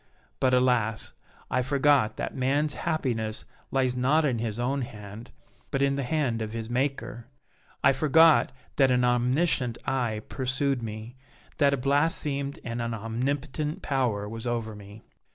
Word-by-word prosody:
But, 130 - +3
alas! 125 -4 +2 0.4
I 130 - +2
forgot 140 -3 +2
that - - -3
man's 145 +3 +1
happiness 115 -8 -2 0.2
lies 130 -2 +1
not 140 +6 +3
in 125 -5 0
his 110 -1 -3
own 135 +3 0
hand, 105 0 -8 0.4
but 135 0 0
in 140 0 +2
the 140 - -1
hand 130 -4 0
of 110 0 -4
his 115 0 -5
Maker. 125 -2 -2 0.6
I - - +6
forgot 155 +3 +5 0.3
that 135 -2 +5
an 125 0 +3
omniscient 125 +1 +1
eye 120 -5 -1
pursued 135 0 -1
me, 110 +2 -7 0.4
that 140 -2 +4
a - - -6
blasphemed 140 0 0
and 120 0 -3
omnipotent 130 - -2
Power 120 -7 0
was 115 +3 -6
over 115 -2 -2
me. 105 +1 -12
125 Hz, 145 wpm, -27 LUFS, 115-140 Hz, 0.6 s, I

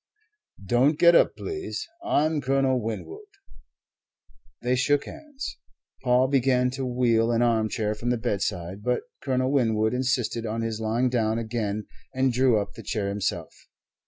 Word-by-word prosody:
"Don't 130 +9 +3
get 170 +1 +6
up, - - +4
please. 385 -3 -5 0.2
I'm 155 - +1
Colonel 135 -1 +1
Winwood." 100 -8 -6 1.4
They 125 +1 +2
shook 140 +3 +2
hands. 290 -3 -8 0.4
Paul 125 0 +3
began 130 -2 +2
to 130 0 -3
wheel 120 -2 +2
an 115 +1 +2
armchair 110 -2 +1
from 115 +3 -4
the 125 - +1
bedside, 95 -3 -3
but 125 +3 0 0.2
Colonel 130 -1 0
Winwood 110 -5 +2
insisted 125 -2 0
on 115 0 -3
his 115 -1 -3
lying 115 +3 +1
down 115 -2 0
again 110 -2 -3 0.3
and 130 -1 +2
drew 125 -3 +3
up 100 0 -5
the - - -10
chair 105 -3 -2
himself. 100 0 -3
120 Hz, 145 wpm, -26 LUFS, 110-130 Hz, 1.4 s, get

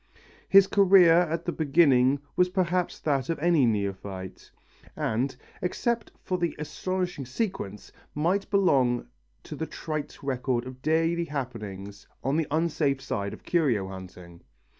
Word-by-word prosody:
His 195 0 +8
career 195 -4 +6
at 170 -1 +1
the 175 - 0
beginning 140 -4 +3
was 180 0 +3
perhaps 180 -1 0
that 140 -3 0
of 165 - 0
any 165 -4 +3
other 115 - +3
neophyte, 95 -2 -5 0.5
and 125 +4 -1 0.3
except 230 +5 -1
for 185 -1 -2
the 170 -1 -1
astonishing 175 -1 -3
sequence, 130 - -4 0.2
might 180 +7 0
belong 135 - +2 0.4
to - - -8
the 160 - -4
trite 155 -3 -5
record 125 -2 -1
of 130 0 -9
daily 165 +3 +1
happenings 105 - -6 0.2
on 135 +3 0
the 160 -2 0
unsafe 150 -3 0
side 100 -7 -3
of - - -11
curio 125 - +1
hunting. 90 -2 -11
145 Hz, 140 wpm, -27 LUFS, 120-175 Hz, 0.5 s, His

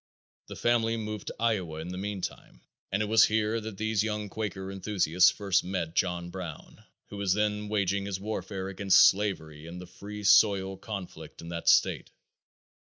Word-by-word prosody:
The - - -8
family 115 -1 +1
moved 105 -1 -5
to - - -5
Iowa 95 -9 -1
in 80 +2 -6
the 90 - -5
meantime 95 -10 -6 0.3
and 100 +2 +1
it - - -1
was 110 +1 +6
here 110 +1 0
that 110 -2 -7
these 110 0 0
young 105 -1 -2
Quaker 95 -3 -4
enthusiasts 90 -3 +3
first 100 -2 0
met 90 -3 -3
John 85 -1 -1
Brown, 90 -4 -8 0.3
who 100 - -8
was 100 -2 +1
then 105 0 -1
waging 100 -1 0
his 95 -2 -3
warfare 100 -2 -4
against 95 0 +5
slavery 80 -7 -2
in 85 +1 -8
the 90 - -8
free 100 +4 -9
soil 100 -1 +4
conflict 95 -1 -8
in 85 - -8
that 85 -1 0
state. - - +3
100 Hz, 175 wpm, -28 LUFS, 90-105 Hz, 0.3 s, was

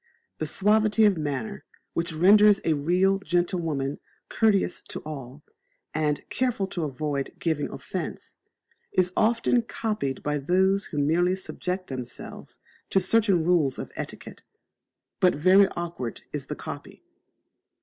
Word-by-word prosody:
That - - -1
suavity 215 +2 +3
of 205 -2 +4
manner 140 - -4 0.3
which 170 +1 -1
renders 200 +5 +6
a 160 - +3
real 180 +6 +2
gentlewoman 165 -6 -1 0.3
courteous 205 -5 +2
to - - -5
all, 140 -2 -8 0.5
and 150 -1 -1
careful 245 -6 0
to 170 -3 -2
avoid 140 0 -3
giving 160 -4 -1
offence, - - -6 0.6
is 180 -1 +1
often 230 +2 +3
copied 210 - -3
by 150 0 0
those 190 +6 +2
who 150 - -7
merely 170 +6 +2
subject 185 0 -4
themselves 130 -5 -8 0.3
to 195 - +3
certain 195 -3 +3
rules 160 -6 +2
of - - -6
etiquette: - - -7 0.8
but 180 - +4
very 185 +6 +6
awkward 170 -9 -5
is - - -4
the - - -4
copy. - - -9
175 Hz, 130 wpm, -26 LUFS, 150-195 Hz, 0.8 s, renders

